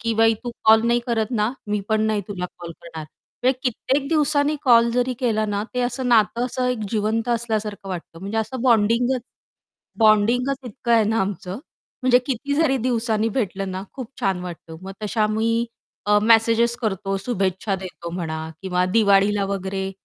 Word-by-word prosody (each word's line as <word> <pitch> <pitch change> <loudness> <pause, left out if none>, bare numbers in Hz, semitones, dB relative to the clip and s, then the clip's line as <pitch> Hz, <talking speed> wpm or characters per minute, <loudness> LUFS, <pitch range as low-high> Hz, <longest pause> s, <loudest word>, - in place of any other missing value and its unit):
की 230 0 -1
"बाई 225 0 +4
तू 240 - -3
कॉल 220 0 +7
नाही 240 +1 +3
करत 225 -2 0
ना, 220 0 0
मी 205 0 -1
पण 220 0 +2
नाही 215 -1 +1
तुला 180 -3 -4
कॉल 170 -1 -7
करणार" 165 -2 -8 0.4
म्हणजे 255 0 +2
कित्येक 270 +3 -1
दिवसांनी 300 -1 +2
कॉल 235 -2 +5
जरी 250 +1 0
केला 220 -3 +1
ना, 205 0 -1
ते 250 - 0
असं 250 +1 -2
नातं 235 +1 +3
असं 255 0 -2
एक 250 -2 -1
जिवंत 220 +1 0
असल्यासारखं 215 -4 -2
वाटतं 170 -2 -7
म्हणजे 200 +3 -3
असं 225 +3 -3
बॉन्डिंगचं 240 +2 +3 0.8
बॉन्डिंगचं 240 +5 +3
इतकं 235 +2 -2
आहे 225 -2 +5
ना, 220 +1 +1
आमचं 190 +1 -3 0.4
म्हणजे 250 -1 +5
किती 280 +2 -2
जरी 290 -3 +2
दिवसांनी 225 -2 0
भेटलं 195 -5 -2
ना 185 +1 -4
खूप 255 -4 -6
छान 190 -2 0
वाटतं. 170 -2 -8
मग 195 +1 -7
तश्या 215 +1 0
आम्ही 230 +2 +1 0.4
अ, 210 0 +5
मेसेजेस 230 +1 +4
करतो, 195 -4 -2
शुभेच्छा 195 -2 -1
देतो 180 -2 -8
म्हणा 160 -3 -3 0.2
किंवा 180 -1 0
दिवाळीला 200 0 +3
वगैरे 190 0 -3
220 Hz, 170 wpm, -22 LUFS, 195-240 Hz, 0.8 s, कॉल